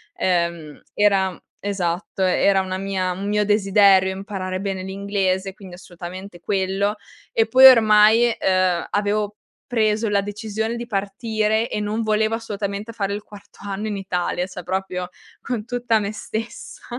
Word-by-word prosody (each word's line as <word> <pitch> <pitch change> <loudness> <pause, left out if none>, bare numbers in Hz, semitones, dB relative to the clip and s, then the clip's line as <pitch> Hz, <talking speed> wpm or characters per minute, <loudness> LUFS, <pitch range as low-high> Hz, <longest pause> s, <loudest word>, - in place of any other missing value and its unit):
ehm, 170 -4 -1
era 195 -2 +3
mhmm, 180 - -10 0.2
esatto, 190 -1 -2
era 190 +1 +3
una 185 0 -4
mia 190 -2 -1
un 190 +3 -4
mio 210 0 +1
desiderio 195 -2 +4
imparare 190 -2 -4
bene 195 -1 -3
l'inglese 190 0 -2
quindi 190 -3 -12
assolutamente 180 +1 -9
quello. 195 +3 0 0.4
E 225 0 +2
poi 260 +4 +7
ormai 225 0 +6
uhm, 185 -2 +1
avevo 210 0 -1 0.3
preso 220 -2 +1
la 200 -1 +2
decisione 220 +2 -4
di 235 0 -5
partire 215 +1 -1
e - - -2
non 210 +2 -2
volevo 220 +1 +1
assolutamente 210 0 -5
fare 200 -2 -2
il 205 - -7
quarto 205 -1 -15
anno 205 +1 -4
in 205 - -3
Italia. 180 -2 -2
Cioè 180 -1 -8
proprio 180 0 -3 0.3
con 235 -5 -4
tutta 245 -2 0
me 205 0 -3
stessa. 225 +2 -7
200 Hz, 150 wpm, -22 LUFS, 190-215 Hz, 0.4 s, poi